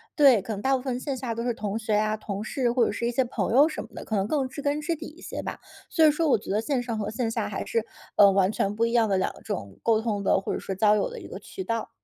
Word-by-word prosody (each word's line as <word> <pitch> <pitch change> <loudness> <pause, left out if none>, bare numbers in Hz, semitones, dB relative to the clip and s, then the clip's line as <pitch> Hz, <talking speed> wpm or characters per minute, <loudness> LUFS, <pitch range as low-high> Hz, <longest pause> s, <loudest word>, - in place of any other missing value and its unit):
对， 270 -8 +6
可 195 - -6
能 200 - -5
大 270 0 +3
部 260 - -2
分 250 -1 -2
线 275 +1 -3
下 240 -2 -4
都 230 - -3
是 240 0 0
同 210 -1 -3
学 220 -1 -2
啊， 215 +1 +1
同 205 -1 -5
事 245 +1 0
或 245 0 +3
者 - - 0
是 230 +3 -3
一 - - 0
些 260 +2 +2
朋 245 - -2
友 280 +5 +7
什 310 - -5
么 - - -13
的， - - -7
可 220 - -3
能 195 0 +1
更 275 +1 0
知 285 - -7
根 290 +1 0
知 330 +2 -1
底 - - -8
一 315 +3 -14
些 - - -5
吧。 - - -5 0.3
所 325 -3 +4
以 - - +8
说 320 +2 0
我 275 - +4
觉 - - -11
得 205 - +2
线 265 +1 0
上 235 -2 -3
和 210 -1 -2
线 230 +1 -1
下 225 -1 -2
还 200 - -3
是， 230 -1 0 0.3
呃， 200 -1 +7
完 195 0 +3
全 200 -1 -1
不 225 - +1
一 230 - -1
样 230 -2 +4
的 195 -2 +2
两 185 - 0
种 100 -3 -5
沟 225 -1 +3
通 210 -3 -2
的， 190 - +3
或 - - -3
者 - - -2
说 195 - -4
交 210 +2 +4
友 210 - +1
的 480 - -8
一 - - -10
个 - - -7
渠 380 - -7
道。 230 -8 -2
230 Hz, 350 characters per minute, -26 LUFS, 210-265 Hz, 0.3 s, 以